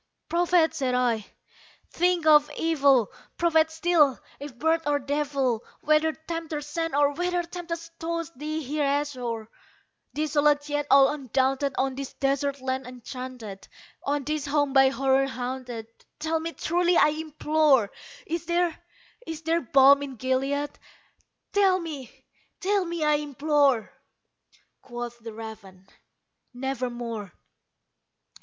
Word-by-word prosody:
"Prophet!" 345 -1 +3
said 265 -5 -1
I, 235 -4 +1 0.6
"thing 355 -1 +1
of 300 -1 +6
evil! 280 -8 +3 0.3
prophet 320 -2 +3
still, 320 -4 +3 0.2
if 280 -3 -9
bird 320 +4 +2
or 290 0 +3
devil! 275 -4 -1 0.2
Whether 310 +1 +3
Tempter 320 -1 -5
sent, 330 +2 -3
or 290 0 +3
whether 355 +2 -1
tempest 335 -1 -6
tossed 335 0 -4
thee 305 +3 -4
here 295 +3 -1
ashore, 255 -6 -2 0.7
Desolate 295 -1 +2
yet 290 0 -1
all 275 -1 +7
undaunted, 270 -1 0
on 265 0 +1
this 275 0 -6
desert 275 0 -1
land 260 0 -2
enchanted 250 -4 -8 0.3
On 290 0 -1
this 300 0 -2
home 290 -1 +1
by 270 -1 +6
Horror 270 0 +2
haunted 250 -2 -5 0.3
tell 320 +1 -1
me 330 +1 -5
truly, 350 +1 +1
I - - +6
implore 305 -6 +2 0.3
Is 335 0 -4
there 345 -1 +1 0.5
is 320 0 -6
there 330 +1 +1
balm 275 +2 +6
in 275 -2 -6
Gilead? 270 +4 -1 0.7
tell 390 -2 +4
me 295 -8 -8 0.3
tell 395 0 +1
me, 340 -2 -3
I 300 -1 +4
implore!" 285 -4 +1 0.9
Quoth 240 -1 -7
the 230 0 -8
raven, 215 -4 -10 0.7
"Nevermore." 240 -5 -4
285 Hz, 125 wpm, -26 LUFS, 260-320 Hz, 0.9 s, all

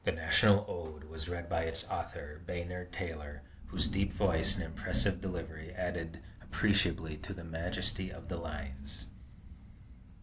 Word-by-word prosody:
"The - - +3
National 105 -1 +6
Ode" 80 -3 -5
was 80 +1 -5
read 85 -1 -3
by 85 - +1
its 80 0 -2
author, 75 +2 -4
Bayard 90 +1 -4
Taylor, 80 -5 -5 0.2
whose - - +1
deep 100 0 +1
voice 95 -1 +4
and 95 - -2
impressive 95 +3 +2
delivery 80 -3 -4
added 85 -2 -3 0.2
appreciably 85 -7 +3
to 95 +5 -6
the 85 - -8
majesty 90 +4 +1
of 95 - -9
the 90 -1 -2
lines. 75 -4 -6
85 Hz, 140 wpm, -34 LUFS, 80-95 Hz, 0.2 s, National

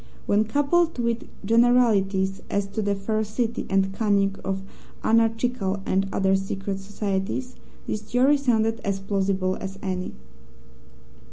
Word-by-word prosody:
When 210 +2 +3
coupled 290 +8 +2
with 235 -1 -1 0.2
generalities 210 -5 +3
as 200 0 0
to 215 +2 -2
the 205 -1 0
ferocity 220 +3 -2
and 195 0 +2
cunning 200 -2 +2
of 190 0 -2 0.4
anarchical 225 -3 +1
and 195 +1 +1
other 195 -1 +2
secret 195 0 -3
societies, 200 +5 -3 0.3
this 210 - -3
theory 250 +6 +3
sounded 225 -4 +1
as 195 -1 -1
plausible 195 -1 0
as 195 0 -6
any. 185 - -3
205 Hz, 120 wpm, -25 LUFS, 195-230 Hz, 0.4 s, When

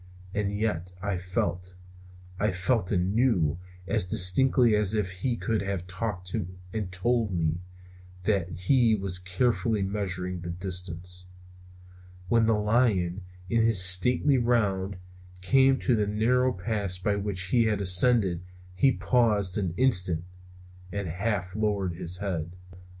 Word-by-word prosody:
And 100 -1 -1
yet 100 -4 -3
I 100 +1 -2
felt, 90 0 -3 0.6
I 105 - +1
felt 95 +2 -1
and 90 0 0
knew, 90 - +1 0.3
as 110 -2 +2
distinctly 110 +7 +4
as 105 0 +1
if 100 -4 -1
he 105 +7 -2
could 110 -1 -1
have 100 -2 -4
talked 95 -1 -5 0.4
and 105 -4 -4
told 110 +4 0
me, 85 -2 -1 0.6
that 95 -3 0
he 110 +7 +2
was 95 -3 -2
carefully 110 +3 0
measuring 90 -2 -3
the 85 - -6
distance. 90 0 -4 1.0
When 115 0 +3
the 110 -1 +2
lion, 105 -5 +1 0.3
in 115 +4 +1
his 115 -3 +3
stately 125 +9 +4
round, 100 -5 0 0.4
came 135 +6 +3
to 125 - +2
the 105 -2 0
narrow 125 +5 +1
pass 100 -1 -2
by 100 +3 -1
which 95 -2 -3
he 115 +1 +3
had 105 -2 0
ascended 95 -1 +4 0.3
he 130 +9 +3
paused 105 -8 +1
an 90 -4 -3
instant, 90 -10 +2 0.7
and 100 -2 -4
half 95 +1 -3
lowered 100 -4 -1
his 85 +1 -2
head. 90 -4 -4
100 Hz, 135 wpm, -27 LUFS, 90-110 Hz, 1.0 s, distinctly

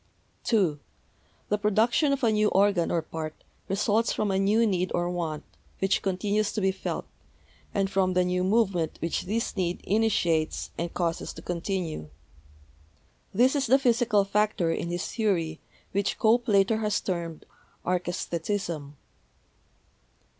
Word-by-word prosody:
(2) 185 -10 +2 0.7
The 210 - +1
production 220 +8 +3
of 275 -1 -1
a 230 - +4
new 215 0 +3
organ 195 -4 +3
or 165 -2 0
part 155 -1 -5 0.3
results 210 +3 +1
from 210 -2 0
a 190 - +1
new 210 +4 +3
need 185 -3 0
or 175 0 0
want, 165 -4 -3 0.3
which 195 0 +1
continues 200 +2 0
to - - -1
be 190 -1 +2
felt, 190 - -4 0.7
and 195 -1 +1
from 190 -1 +1
the 180 0 +3
new 180 0 0
movement 190 -5 +1
which 165 +2 -2
this 220 +5 -2
need 180 -3 -1
initiates 185 -7 +1
and 170 0 -3
causes 170 -2 -1
to 160 - -11
continue. 170 - -3 1.2
(This 255 +4 +3
is 275 -3 +1
the 260 +4 +6
psychical 235 -6 +3
factor 205 -4 +1
in 170 - -2
his 175 0 -2
theory, 170 -8 -1 0.3
which 200 0 0
Cope 235 +2 +3
later 200 +1 +4
has 210 -2 0
termed 170 -3 -4 0.4
Archesthetism.) 175 -3 -2
195 Hz, 140 wpm, -27 LUFS, 175-215 Hz, 1.2 s, the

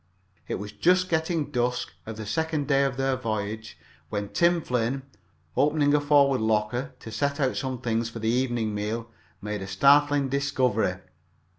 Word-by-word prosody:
It - - -2
was 105 +1 -6
just 185 +6 +2
getting 160 -2 0
dusk 125 -1 -1 0.2
of 110 -1 -6
the 110 - -6
second 160 +3 -1
day 140 -1 +3
of 130 -2 -2
their 135 0 +1
voyage, 110 -3 -4 0.3
when 100 -1 -3
Tim 170 0 +3
Flynn, 125 -1 -1 0.5
opening 145 +2 +3
a 150 - +4
forward 140 -3 +4
locker 110 +4 0
to 110 - -8
set 140 +6 -1
out 135 -2 +1
some 130 -3 -3
things 115 -1 -1
for 115 - -8
the 110 0 -3
evening 120 -2 0
meal, 110 +3 -3 0.3
made 105 -1 -3
a 95 - -5
startling 140 +7 +4
discovery. 130 -8 +1
130 Hz, 165 wpm, -26 LUFS, 110-145 Hz, 0.5 s, a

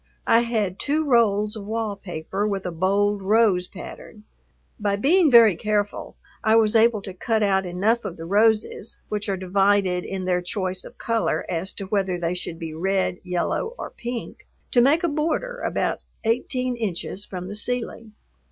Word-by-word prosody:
I 230 - +5
had 220 -6 -1
two 305 +2 0
rolls 215 -5 +3
of 205 -2 -8
wall 220 -1 -2
paper 190 +2 -4
with 195 -2 -3
a 180 - -2
bold 200 +4 +1
rose 195 -3 +3
pattern. 210 +2 -11 0.6
By 205 -1 +1
being 315 - +4
very 230 -6 +7
careful 205 +1 -2 0.3
I 220 0 +4
was 225 0 +4
able 225 -2 +4
to 190 - -7
cut 220 +3 0
out 190 -2 +2
enough 210 +7 +1
of 170 - -6
the 165 - -7
roses, 215 +3 +1
which 210 0 -3
are 195 - 0
divided 190 -1 +2
in 190 -1 -4
their 180 -1 +1
choice 185 0 -3
of - - -12
color 230 -1 -1
as 180 +2 -2
to 195 - -6
whether 190 -2 0
they 170 0 -1
should 175 -2 -5
be 165 -2 -6
red, 190 +2 0
yellow, 180 - -2
or - - -6
pink, 240 -1 -7 0.2
to 245 - +5
make 290 +7 +4
a - - +3
border 330 +12 -1
about - - -1 0.2
eighteen 250 +2 0
inches 200 -3 -3
from 180 -3 -7
the 205 - -6
ceiling. 230 -1 -3
205 Hz, 175 wpm, -24 LUFS, 185-230 Hz, 0.6 s, very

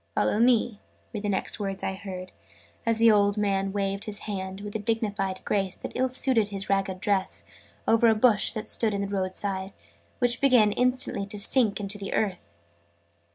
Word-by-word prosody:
"Follow 210 - +1
me!" 235 -3 +3 0.3
were 215 - -3
the 205 0 -3
next 195 +2 -2
words 195 -2 -4
I - - -1
heard, 185 -2 -7 0.6
as 230 -1 +2
the 230 0 +6
old 205 0 +3
man 195 -2 0
waved 195 0 -2
his 210 -2 -3
hand, 190 -1 -5
with 205 0 -7
a - - 0
dignified 205 -3 -2
grace 195 -3 0
that - - -7
ill 260 0 0
suited 250 -4 +1
his 195 -1 -3
ragged 195 -1 0
dress, 195 -1 -1 0.4
over 230 +1 +5
a 220 - +5
bush, 215 -2 +4
that 215 - -5
stood 220 -2 +1
by - - -1
the 200 0 -2
road 190 -2 -2
side, 195 -1 -3 0.4
which 245 +2 +1
began 245 -6 +5
instantly 250 -4 +2
to 210 +1 -4
sink 215 +1 +2
into 200 0 -4
the 195 - -5
earth. 180 - -2
205 Hz, 190 wpm, -26 LUFS, 195-220 Hz, 0.6 s, the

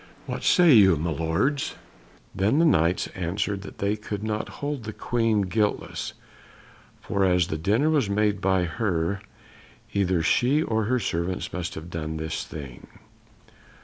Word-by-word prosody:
What - - -5
say 175 -4 +6
you, 95 -6 +7
my 80 +3 -2
lords?" 80 - 0 0.6
Then 100 +7 +1
the 165 - +4
Knights 85 - +3
answered 95 +3 -2
that 100 - -10
they 100 +1 0
could 105 -1 -6
not 110 -1 -2
hold 145 -3 -3
the 110 - -5
Queen 115 -3 +1
guiltless, 105 +2 -1 0.9
for 100 -1 -1
as 90 -2 +3
the 80 - -2
dinner 105 - +2
was 140 -10 +2
made 105 0 +1
by 95 -1 +2
her 90 0 -1 0.7
either 95 -4 +1
she 135 - +3
or 110 -5 0
her 125 +4 +1
servants 90 -3 -2
must 90 0 -4
have 80 +2 -8
done 80 -1 -4
this 80 +1 -3
thing. 70 -5 -9
100 Hz, 150 wpm, -25 LUFS, 85-110 Hz, 0.9 s, you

